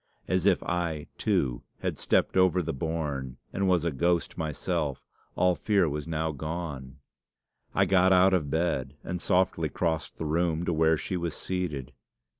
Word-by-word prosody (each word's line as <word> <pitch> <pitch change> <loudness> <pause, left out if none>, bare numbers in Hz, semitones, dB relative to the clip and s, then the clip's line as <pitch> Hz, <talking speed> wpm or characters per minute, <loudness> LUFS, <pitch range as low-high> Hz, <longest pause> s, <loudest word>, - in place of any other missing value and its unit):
As - - +1
if - - +3
I, 85 -4 -2
too, - - +1 0.2
had - - -2
stepped - - +2
over 95 -1 +4
the 80 - -2
bourne, 70 -4 -3 0.2
and 95 0 0
was 90 -3 +3
a 85 - +1
ghost 85 +4 0
myself, 80 -2 -2 0.3
all 90 0 +3
fear 100 -3 +2
was 75 +1 -3
now 80 0 -1
gone. 75 -3 -5 0.8
I 95 - +4
got 95 0 +4
out 95 +1 +6
of 80 -6 +1
bed, 70 -5 -1
and 90 0 -4
softly 90 +1 +2
crossed 80 -2 -2
the 80 - -4
room 85 +1 0
to 85 - 0
where 80 0 +3
she 90 - -3
was 85 -2 -3
seated. 85 -9 -3
80 Hz, 165 wpm, -28 LUFS, 75-90 Hz, 0.8 s, out